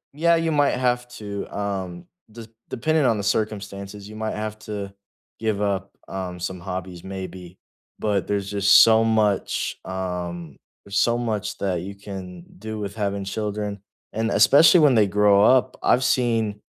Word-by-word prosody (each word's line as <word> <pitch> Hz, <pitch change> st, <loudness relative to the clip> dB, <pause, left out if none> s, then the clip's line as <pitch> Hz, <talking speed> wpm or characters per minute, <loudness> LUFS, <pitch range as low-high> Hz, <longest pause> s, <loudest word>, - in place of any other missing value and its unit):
yeah, 170 Hz, +2 st, +3 dB
you 165 Hz, -1 st, 0 dB
might 145 Hz, -3 st, +2 dB
have 125 Hz, -1 st, 0 dB
to, 105 Hz, -4 st, -6 dB
um, 95 Hz, -4 st, -4 dB, 0.3 s
des 115 Hz, 0 st, -10 dB, 0.2 s
depending 155 Hz, +4 st, +1 dB
on 115 Hz, -3 st, +3 dB
the 100 Hz, -, -3 dB
circumstances, 100 Hz, -1 st, -3 dB
you 110 Hz, -, -11 dB
might 110 Hz, 0 st, -3 dB
have 110 Hz, 0 st, -5 dB
to 100 Hz, -2 st, -6 dB, 0.5 s
give 110 Hz, -2 st, -1 dB
up, 100 Hz, -1 st, -1 dB, 0.2 s
um, 90 Hz, -2 st, -5 dB
some 90 Hz, +1 st, -4 dB
hobbies, 90 Hz, -1 st, -6 dB
maybe, 95 Hz, -2 st, -8 dB, 0.4 s
but 100 Hz, -4 st, -1 dB
there's 100 Hz, -1 st, -2 dB
just 100 Hz, 0 st, +6 dB
so 115 Hz, 0 st, +5 dB
much, 110 Hz, -3 st, 0 dB
um 90 Hz, -4 st, -5 dB, 0.3 s
there's 100 Hz, 0 st, -1 dB
so 120 Hz, 0 st, +2 dB
much 105 Hz, -3 st, -3 dB
that 95 Hz, -2 st, -1 dB
you 100 Hz, +2 st, -7 dB
can 95 Hz, -3 st, -9 dB, 0.2 s
do 110 Hz, +1 st, -6 dB
with 100 Hz, 0 st, -5 dB
having 100 Hz, -2 st, -2 dB
children, 105 Hz, 0 st, -4 dB, 0.3 s
and 110 Hz, +1 st, -1 dB
especially 145 Hz, -, +6 dB
when 140 Hz, -5 st, +5 dB
they 105 Hz, -2 st, +4 dB
grow 100 Hz, 0 st, +4 dB
up, 130 Hz, +2 st, +4 dB
I've 125 Hz, -, +3 dB
seen 115 Hz, -5 st, +1 dB
105 Hz, 160 wpm, -23 LUFS, 95-110 Hz, 0.5 s, just